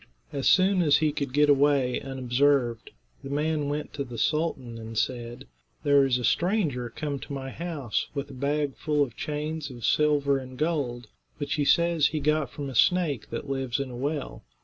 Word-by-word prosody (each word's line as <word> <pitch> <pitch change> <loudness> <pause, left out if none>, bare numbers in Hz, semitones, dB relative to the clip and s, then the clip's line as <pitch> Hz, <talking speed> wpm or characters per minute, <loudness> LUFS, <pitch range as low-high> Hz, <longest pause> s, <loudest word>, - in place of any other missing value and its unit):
As 140 -2 +2
soon 190 0 +4
as 150 -3 +5
he 155 -1 +2
could 140 -2 -3
get 150 +2 +4
away 140 -3 +3
unobserved, 130 -2 +1 0.3
the 135 - -7
man 150 0 0
went 150 +1 -4
to 145 - -3
the 120 -3 -8
sultan 130 -4 -1
and 110 0 -7
said: 120 +2 -2 0.4
"There 145 -2 +5
is 125 -2 +2
a 125 - -5
stranger 155 - +1
come 140 +3 -4
to - - -10
my 135 -1 -5
house 155 -10 -3
with 140 0 -4
a - - -10
bag 140 +1 -1
full 150 -2 +1
of 120 -5 -6
chains 150 0 -4
of 120 -3 -7
silver 145 -2 +3
and 130 -1 -10
gold, 140 -7 -1 0.3
which 145 -1 -2
he 145 -2 0
says 170 -1 +4
he 155 - -2
got 150 0 +1
from 145 -1 -6
a 135 - -6
snake 155 - +2
that - - -5
lives 135 -2 -2
in 135 -2 -3
a - - -7
well. 140 +3 -3
140 Hz, 195 wpm, -27 LUFS, 130-150 Hz, 0.4 s, as